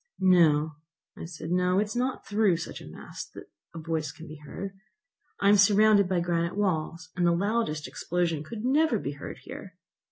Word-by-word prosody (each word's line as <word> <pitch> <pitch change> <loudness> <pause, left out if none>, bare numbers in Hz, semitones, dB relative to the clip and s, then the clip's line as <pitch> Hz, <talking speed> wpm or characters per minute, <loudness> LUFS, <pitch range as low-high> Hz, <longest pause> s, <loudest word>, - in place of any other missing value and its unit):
"No," 160 -5 +4 0.4
I - - -7
said, 165 -1 -7
"no; 180 +1 +2
it 205 - +4
is 215 +2 -7
not 255 +2 -1
through 205 -4 +2
such 165 - -7
a - - -11
mass - - -8
that - - -11 0.2
a - - -5
voice 160 -1 -2
can 165 - -12
be 155 +1 -9
heard. 170 +6 -7 0.7
I 200 - +2
am 205 +1 +7
surrounded 205 -1 +5
by 180 -2 +1
granite 170 +1 -1
walls, 165 -4 -1
and 180 - 0
the 170 - +4
loudest 195 -5 -1
explosion 170 -3 -1
could 220 +7 -6
never 285 -1 +3
be 140 - -4
heard 140 -1 -8
here! - - -10
180 Hz, 190 wpm, -28 LUFS, 160-205 Hz, 0.7 s, am